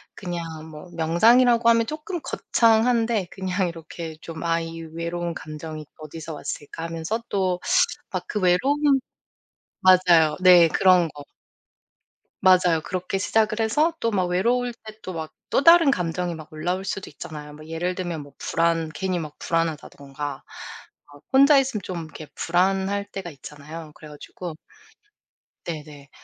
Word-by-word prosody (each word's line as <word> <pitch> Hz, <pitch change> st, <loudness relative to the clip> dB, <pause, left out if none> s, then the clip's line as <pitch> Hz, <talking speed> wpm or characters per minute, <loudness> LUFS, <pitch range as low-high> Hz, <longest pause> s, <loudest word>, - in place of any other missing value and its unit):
그냥 175 Hz, -3 st, -5 dB, 0.3 s
뭐 155 Hz, +3 st, -11 dB
명상이라고 230 Hz, +9 st, +4 dB
하면 230 Hz, -1 st, +4 dB
쪼끔 315 Hz, +4 st, -5 dB
거창한데 225 Hz, -3 st, +2 dB
그냥 190 Hz, -1 st, -1 dB
이렇게 165 Hz, -1 st, -8 dB
좀 165 Hz, 0 st, -8 dB
'아 165 Hz, 0 st, +1 dB
이 165 Hz, 0 st, -7 dB
외로운 170 Hz, +1 st, -4 dB
감정이 155 Hz, 0 st, -8 dB
어디서 155 Hz, +1 st, -8 dB
왔을까.' 150 Hz, +2 st, -6 dB
하면서 165 Hz, +7 st, -3 dB
또 185 Hz, -2 st, 0 dB, 0.5 s
막 180 Hz, -1 st, -3 dB
그 210 Hz, -, -2 dB
외로움 275 Hz, +10 st, +3 dB, 0.8 s
맞아요. 180 Hz, -4 st, +5 dB
네. 180 Hz, -2 st, +8 dB
그런 180 Hz, -1 st, +4 dB
거. 145 Hz, -1 st, -11 dB, 1.2 s
맞아요. 180 Hz, -3 st, +4 dB
그렇게 185 Hz, +1 st, -3 dB
시작을 215 Hz, +2 st, +1 dB
해서 295 Hz, +10 st, +2 dB
또 230 Hz, -, 0 dB
막 185 Hz, -3 st, +1 dB
외로울 235 Hz, +7 st, +1 dB
때 215 Hz, -1 st, -13 dB
또 185 Hz, -, -6 dB
막 160 Hz, -1 st, -5 dB, 0.2 s
또 275 Hz, -, +2 dB
다른 335 Hz, -3 st, +7 dB
감정이 175 Hz, -1 st, -2 dB
막 155 Hz, 0 st, -10 dB
올라올 180 Hz, +5 st, -2 dB
수도 195 Hz, -1 st, -4 dB
있잖아요. 150 Hz, 0 st, -9 dB
뭐 155 Hz, +1 st, -12 dB
예를 165 Hz, +3 st, -2 dB
들면 175 Hz, -4 st, -4 dB
뭐 145 Hz, 0 st, -13 dB
불안 165 Hz, -1 st, 0 dB
괜히 185 Hz, 0 st, -2 dB
막 155 Hz, -2 st, -7 dB
불안하다든가 145 Hz, -4 st, -3 dB, 0.7 s
어 145 Hz, -, -15 dB
혼자 280 Hz, +2 st, +7 dB
있으면 255 Hz, -6 st, -1 dB
좀 170 Hz, -3 st, -5 dB
이렇게 155 Hz, -1 st, -10 dB
불안할 190 Hz, +3 st, +1 dB
때가 190 Hz, -3 st, -6 dB
있잖아요. 150 Hz, +3 st, -10 dB
그래 155 Hz, -, -12 dB
가지고 155 Hz, +3 st, -8 dB, 1.1 s
네네. 150 Hz, -4 st, -8 dB
175 Hz, 295 characters per minute, -24 LUFS, 160-200 Hz, 1.2 s, 네